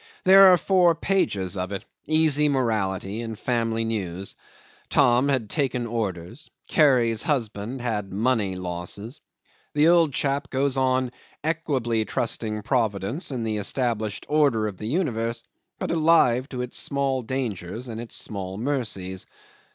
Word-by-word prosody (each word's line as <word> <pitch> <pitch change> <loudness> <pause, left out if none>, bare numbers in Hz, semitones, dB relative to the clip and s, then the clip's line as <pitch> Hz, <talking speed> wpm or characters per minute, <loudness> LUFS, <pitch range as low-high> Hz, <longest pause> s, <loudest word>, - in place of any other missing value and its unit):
There 195 +1 +8
are 180 -1 +7
four 175 -1 +3
pages 100 - 0
of 90 0 -3
it, 100 - -5 0.2
easy 155 -2 +3
morality 110 -5 -1
and 115 -2 -6
family 115 -2 -1
news. 95 -4 -4 0.5
Tom 125 +3 +4
had 130 -6 0
"taken 130 -1 -1
orders." 110 - -4 0.2
Carrie's 120 -7 +3
husband 120 -3 -2
had 105 -5 -2
"money 105 -2 0
losses." 90 - -6 0.5
The 150 +2 +5
old 170 -3 +5
chap 140 +1 -1
goes 135 0 0
on 130 -1 +1 0.3
equably 140 -9 0
trusting 110 -1 -2
Providence 115 - -1
and 125 -5 -3
the 110 -1 -1
established 110 -1 -2
order 140 -8 +2
of 105 -3 -4
the 105 - -6
universe, 115 -6 -1 0.3
but - - -3
alive 155 -6 +3
to 125 -2 -4
its 125 - -5
small 140 -2 -1
dangers 115 -3 -4
and 115 -1 -5
its 120 - -5
small 95 -2 -4
mercies. 105 -8 -3
120 Hz, 135 wpm, -25 LUFS, 105-140 Hz, 0.5 s, There